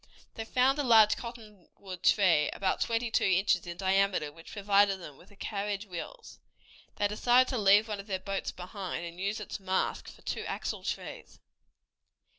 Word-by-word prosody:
They 225 - -6
found 260 +4 +2
a - - +1
large 220 -4 +6
cottonwood 210 -5 -10
tree, 170 -8 +4
about 190 -1 -1
twenty 230 0 0
two - - +2
inches 190 -1 +2
in 175 0 -6
diameter, 190 -4 +1
which 165 +2 -14
provided 200 -1 +3
them 150 -5 -10
with 180 - -19
the 205 - -19
carriage 205 0 -4
wheels. 200 - -9 0.6
They 205 - +1
decided 245 +5 +3
to 255 - -1
leave 205 +2 +5
one 210 -2 -4
of 200 - -9
their 195 -2 -1
boats 195 +1 -4
behind, 180 -1 -6
and 170 +1 -9
use 200 +3 -1
its 210 - -6
mast 190 -1 -2
for - - -16
two - - -3
axle - - -4
trees. - - -6
200 Hz, 175 wpm, -30 LUFS, 185-220 Hz, 0.6 s, large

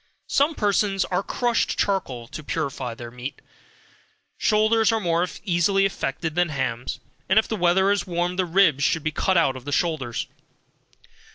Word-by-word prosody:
Some 290 +3 +2
persons 200 -2 +1
use 185 +2 +1
crushed 240 -2 0
charcoal 135 - -1
to 155 +2 -7
purify 135 -6 -3
their 120 0 -9
meat. 125 +3 -7 1.0
Shoulders 220 +1 +3
are 225 - +1
more 170 -2 +1 0.2
easily 195 +2 +2
affected 160 -4 -2
than 175 0 +1
hams, 130 -4 -3 0.3
and 190 - +3
if 220 - +4
the 220 - -2
weather 190 +1 +3
is 200 -3 0
warm 175 0 -1
the 185 0 +1
ribs 165 -5 +3
should 160 +1 +1
be 155 - -1
cut 185 +4 +1
out 135 -6 +3
of 130 - -9
the 145 - -6
shoulders. 145 -7 -1
175 Hz, 165 wpm, -24 LUFS, 145-195 Hz, 1.0 s, if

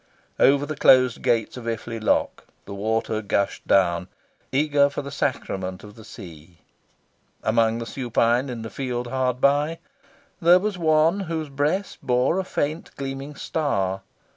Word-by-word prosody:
Over 140 +1 +4
the 155 +1 -5
closed 130 -3 +5
gates 120 -1 0
of 120 - -8
Iffley 115 0 -4
lock, - - 0 0.2
the 100 - -8
water 110 +2 -1
gushed 100 -1 -1
down, 90 -2 +2 0.4
eager 145 0 +3
for 140 - -5
the 140 - -7
sacrament 95 -9 -3
of 105 0 -11
the 110 - -14
sea. 85 -6 -12 0.9
Among 115 0 +2
the 115 - -5
supine 120 +1 0
in 120 -3 -5
the 110 - -7
field 125 -2 -3
hard 125 0 -1
by, 145 +4 +2 0.6
there 175 +2 +7
was 205 +2 -2
one 160 +2 +3
whose 160 -5 -4
breast 150 +8 -1
bore 125 +8 +1
a - - -1
faint 155 -2 -3
gleaming 135 +1 -6
star. 95 - -1
130 Hz, 150 wpm, -24 LUFS, 110-145 Hz, 0.9 s, there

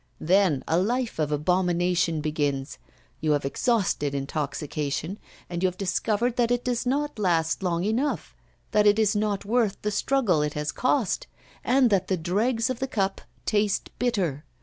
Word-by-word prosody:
Then 180 -4 +3
a 165 - +2
life 235 +1 -1
of 150 -1 0
abomination 175 +1 +1
begins; 145 -2 -2 0.4
you 155 -1 +1
have 145 -1 0
exhausted 160 - 0
intoxication, 145 +5 -3 0.3
and 175 0 -4
you 185 - +4
have 180 0 -4
discovered 215 +5 0
that 240 -2 +2
it 245 0 +1
does 245 0 -1
not 290 -1 -1
last 165 -4 +1
long 175 -2 0
enough, 235 +8 -1 0.4
that 210 -1 +4
it 205 0 +5
is 215 -1 +2
not 205 -1 -1
worth 225 -2 +1
the 210 - 0
struggle 210 - +2
it 150 0 -2
has 150 0 -2
cost, 260 - 0 0.4
and 255 -2 +3
that 190 -2 +2
the 190 - 0
dregs 220 +8 0
of 255 -2 -3
the 265 - -1
cup 195 -6 -1 0.2
taste 205 -2 0
bitter. 190 - 0
195 Hz, 165 wpm, -26 LUFS, 160-230 Hz, 0.4 s, it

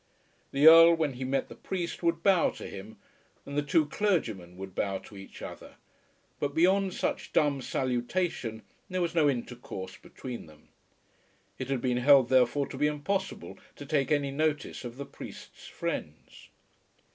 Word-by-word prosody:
The 140 +2 +2
Earl 165 +1 +10
when 155 -4 -1
he 125 +1 -6
met 135 +1 -1
the - - -10
priest 175 -3 -4
would 170 -1 0
bow 190 -4 +4
to - - -9
him, 100 +3 -9 0.5
and 140 - -7
the 145 - +2
two 150 +2 +2
clergymen 115 - -1
would 95 0 -8
bow 95 +1 -1
to 100 - -14
each 95 0 -11
other; - - -9 0.6
but 140 0 -2
beyond 190 +3 +3
such - - -3
dumb 145 -3 +2
salutation 125 -1 -2 0.3
there 185 0 -2
was 170 -1 0
no 155 -4 +4
intercourse 120 -7 -5
between 125 -8 -8
them. 75 -1 -19 0.9
It 130 - -4
had 135 -3 0
been 125 -1 0
held 130 0 +6
therefore 130 +2 +3
to 135 - -7
be 150 +2 +3
impossible 190 +7 -3 0.2
to 145 - -9
take 140 -1 0
any 145 -2 +1
notice 150 -1 -1
of 120 0 -8
the 140 - -5
priest's - - -11
friends. - - -6
140 Hz, 165 wpm, -29 LUFS, 120-165 Hz, 0.9 s, Earl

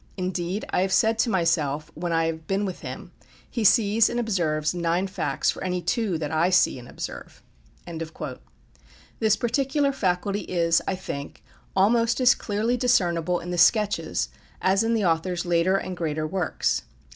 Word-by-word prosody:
Indeed, 185 +1 -2
I - - +2
have 190 0 0
said 220 +3 +3
to 230 - +2
myself 165 -6 0
when 170 +2 -4
I 165 0 +2
have 160 -1 -4
been 195 +1 0
with 185 -2 -5
him, - - -8 0.4
he 235 - -3
sees 215 +1 +4
and 240 - -2
observes 165 -9 0
nine 175 +1 0
facts 195 0 -1
for - - -8
any 180 -1 -1
two 180 +1 -1
that 150 -2 -4
I 160 +3 +2
see 180 - +3
and 120 - -12
observe." - - -8 1.8
This 220 -2 +3
particular 275 +5 +1
faculty 195 -3 -1
is, 170 -2 +1
I 190 - 0
think, 140 -6 -7 0.3
almost 230 +5 +3
as 250 -1 +6
clearly 220 +4 -1
discernible 180 -8 +1
in 175 - -6
the 175 - -1
"Sketches" 210 +3 +2 0.3
as 195 +3 +2
in 230 +1 +1
the 215 -3 +1
author's 175 +2 0
later 175 +2 +2
and 185 -1 -4
greater 155 -3 -2
works. 175 +2 -1
185 Hz, 165 wpm, -25 LUFS, 170-215 Hz, 1.8 s, as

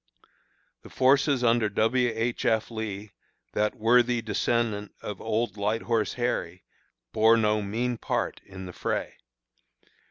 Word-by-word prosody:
The - - -13
forces 135 0 +3
under 115 -2 +3
W. 120 +4 +2
H. 115 +2 -1
F. 110 +1 +1
Lee, 105 -2 -5 0.4
that 105 0 0
worthy 120 +2 +3
descendant 110 -1 -1
of 105 -2 -6
"Old 110 -1 -1
Light 105 +3 -1
Horse 115 -3 0
Harry," 105 -8 -2 0.5
bore 110 +1 +5
no 105 -1 +2
mean 115 +4 -2
part - - -2
in 95 -1 -10
the 90 - -8
fray. - - -3
110 Hz, 130 wpm, -27 LUFS, 105-120 Hz, 0.5 s, bore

